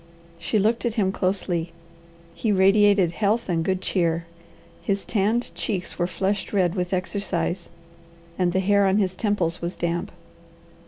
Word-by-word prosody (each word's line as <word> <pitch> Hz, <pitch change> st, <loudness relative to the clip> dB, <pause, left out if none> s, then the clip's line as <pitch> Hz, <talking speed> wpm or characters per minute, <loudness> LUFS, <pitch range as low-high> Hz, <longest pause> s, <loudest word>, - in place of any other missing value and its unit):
She 175 Hz, +6 st, 0 dB
looked 220 Hz, +3 st, +2 dB
at 235 Hz, -2 st, -1 dB
him 195 Hz, -5 st, +2 dB
closely. 185 Hz, -3 st, -1 dB, 0.6 s
He 220 Hz, -, -1 dB
radiated 195 Hz, -1 st, +4 dB
health 215 Hz, +5 st, 0 dB
and 170 Hz, -3 st, 0 dB
good 185 Hz, +1 st, -1 dB
cheer. 170 Hz, -3 st, 0 dB, 0.6 s
His 200 Hz, -1 st, -1 dB
tanned 220 Hz, +3 st, 0 dB
cheeks 185 Hz, -5 st, -3 dB
were 175 Hz, -, +2 dB
flushed 195 Hz, +2 st, -2 dB
red 180 Hz, -4 st, +2 dB
with 180 Hz, -2 st, -2 dB
exercise, 185 Hz, -2 st, -2 dB, 0.7 s
and 180 Hz, -1 st, +1 dB
the 190 Hz, +2 st, +1 dB
hair 200 Hz, +1 st, +3 dB
on 190 Hz, +1 st, +3 dB
his 190 Hz, -3 st, +1 dB
temples 185 Hz, -4 st, -1 dB
was 170 Hz, +1 st, -3 dB
damp. 170 Hz, 0 st, -2 dB
190 Hz, 150 wpm, -24 LUFS, 175-205 Hz, 0.7 s, radiated